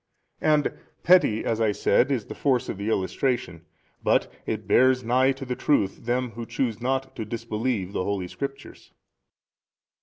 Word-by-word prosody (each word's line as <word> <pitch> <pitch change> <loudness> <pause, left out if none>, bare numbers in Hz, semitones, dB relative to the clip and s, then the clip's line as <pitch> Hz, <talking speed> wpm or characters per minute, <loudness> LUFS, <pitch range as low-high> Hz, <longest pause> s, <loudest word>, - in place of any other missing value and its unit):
And 150 -1 +2 0.3
petty 175 -12 +4
(as 115 0 0
I 110 -2 +3
said) 120 +6 +2
is 125 -6 -1
the - - -7
force 130 -4 0
of 100 - -4
the 100 +2 -2
illustration, 95 -4 -1 0.4
but - - +2
it - - -3
bears 130 0 +4
nigh 130 +3 +3
to 135 0 -8
the 125 -1 -3
truth 110 -9 0
them 125 0 0
who 115 0 -7
choose 120 -2 -2
not 130 +1 -1
to 115 - -4
disbelieve 110 -2 -3
the - - -1
holy 95 -2 -2
Scriptures. 140 +7 -8
120 Hz, 160 wpm, -25 LUFS, 105-130 Hz, 0.4 s, petty